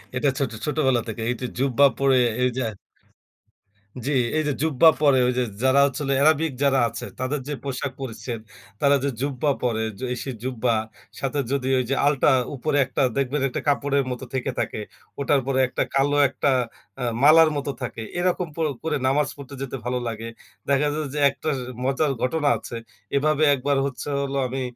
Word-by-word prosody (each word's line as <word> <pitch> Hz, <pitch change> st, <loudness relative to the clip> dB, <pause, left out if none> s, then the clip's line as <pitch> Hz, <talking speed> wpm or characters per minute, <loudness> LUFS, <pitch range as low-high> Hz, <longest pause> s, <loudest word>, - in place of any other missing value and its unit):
এটা 140 Hz, +2 st, +2 dB
ছোট 135 Hz, -5 st, -1 dB
ছোটবেলা 130 Hz, -5 st, +2 dB
থেকে 115 Hz, +1 st, -5 dB
এইটা 125 Hz, +1 st, -2 dB
জুব্বা 135 Hz, +1 st, +4 dB
পরে 135 Hz, -1 st, +4 dB, 0.3 s
এইযে 125 Hz, +1 st, 0 dB, 1.4 s
জি, 145 Hz, -, -1 dB, 0.3 s
এইযে 150 Hz, -2 st, +1 dB
জুব্বা 160 Hz, 0 st, +4 dB
পরে 140 Hz, -3 st, +5 dB
ঐযে 125 Hz, 0 st, +1 dB, 0.2 s
যারা 130 Hz, +1 st, +4 dB
হচ্ছে 140 Hz, +1 st, -3 dB
হল 140 Hz, -, -1 dB
এরাবিক 155 Hz, 0 st, +3 dB
যারা 135 Hz, -1 st, +4 dB
আছে -, -, -6 dB
তাদের 130 Hz, +3 st, -1 dB
যে 150 Hz, -, -2 dB
পোশাক 135 Hz, 0 st, -3 dB
পরিচ্চছেদ 120 Hz, -2 st, -5 dB, 0.4 s
তারা 140 Hz, 0 st, +5 dB
যে 140 Hz, -, +1 dB
জুব্বা 140 Hz, +1 st, 0 dB
পরে, 115 Hz, -2 st, 0 dB, 0.3 s
এই 125 Hz, -, -2 dB
সে 135 Hz, -, -4 dB
জুব্বা 125 Hz, -2 st, 0 dB, 0.5 s
সাথে 140 Hz, +1 st, -2 dB
যদি 135 Hz, -2 st, -1 dB
ওইযে 130 Hz, +2 st, -1 dB
আল্টা 145 Hz, -1 st, +3 dB, 0.3 s
উপরে 145 Hz, +3 st, -1 dB
একটা 130 Hz, -, -2 dB, 0.2 s
দেখবেন 140 Hz, +1 st, 0 dB
একটা -, -, -4 dB
কাপড়ের 140 Hz, -1 st, +2 dB
মতো 125 Hz, +1 st, -5 dB
থেকে 130 Hz, 0 st, -1 dB
থাকে। -, -, -2 dB, 0.4 s
ওটার 140 Hz, 0 st, +2 dB
পরে 130 Hz, -1 st, +1 dB
একটা -, -, -1 dB
কালো 145 Hz, +1 st, +3 dB
একটা 140 Hz, 0 st, 0 dB, 0.5 s
আ -, -, -1 dB, 0.2 s
মালার 160 Hz, +1 st, +8 dB
মতো 140 Hz, 0 st, -2 dB
থাকে। 120 Hz, -2 st, -5 dB, 0.2 s
এরকম 180 Hz, 0 st, 0 dB
করে 160 Hz, -2 st, +1 dB
করে 155 Hz, -2 st, 0 dB
নামাজ 140 Hz, +1 st, +2 dB
পড়তে 140 Hz, 0 st, -10 dB
যেতে 135 Hz, 0 st, -4 dB
ভালো 125 Hz, 0 st, -1 dB
লাগে। 115 Hz, 0 st, -5 dB, 0.4 s
দেখা 140 Hz, +1 st, +3 dB
যায় 155 Hz, -1 st, -2 dB
যে 150 Hz, -, -2 dB
একটা 155 Hz, -, -4 dB, 0.3 s
মজার 135 Hz, +2 st, +1 dB
ঘটনা 145 Hz, +3 st, +1 dB
আছে। 120 Hz, -, -8 dB, 0.4 s
এভাবে 155 Hz, +1 st, +2 dB
একবার 140 Hz, +1 st, 0 dB
হচ্ছে 140 Hz, +1 st, -5 dB
হলো 140 Hz, 0 st, -2 dB
আমি 130 Hz, +1 st, -4 dB
140 Hz, 170 wpm, -24 LUFS, 130-145 Hz, 1.4 s, মালার